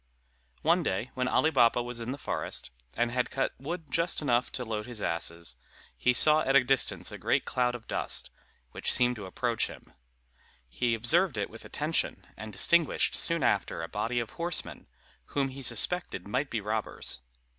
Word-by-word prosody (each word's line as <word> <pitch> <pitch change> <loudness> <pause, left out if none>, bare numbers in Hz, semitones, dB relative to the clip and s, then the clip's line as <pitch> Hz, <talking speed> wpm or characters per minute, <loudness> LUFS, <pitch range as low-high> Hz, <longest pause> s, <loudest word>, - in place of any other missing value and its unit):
One 170 +3 +4
day, 115 - -2
when 125 -1 -1
Ali 155 +5 +3
Baba 120 -3 +4
was 120 0 -6
in 115 +1 -5
the 135 - -3
forest, 100 - -4 0.2
and 120 +1 +1
had 125 0 0
just - - -14
cut 135 - +1
wood 165 +5 -4 0.4
enough 125 -4 +1
to 125 - -2
load 110 0 -4
his 120 -3 -6
asses, 85 -6 -3 0.4
he 125 - +2
saw 155 +5 +7
at 135 -2 +1
a 140 - +7
distance 135 +1 +1
a - - -8
great - - +1
cloud 125 -1 0
of 115 -2 -9
dust, - - -2 0.4
which - - 0
seemed 125 0 +4
to 100 -3 -7
approach 115 +4 0
him. - - -13 0.7
He 115 - 0
observed 140 - +2
it 100 - -2
with - - -11
attention, - - -1
and 110 +2 -8
distinguished 170 +7 +2
soon 165 -3 +2
after - - +1
a - - -4
body 120 +1 -1
of 115 -2 -4
horsemen, 170 0 -2 0.5
whom 135 -1 +2
he 135 +1 -9
suspected 120 - +1
might 135 +7 -1
be 115 - -2
robbers. 105 - -3
125 Hz, 180 wpm, -29 LUFS, 110-140 Hz, 0.7 s, saw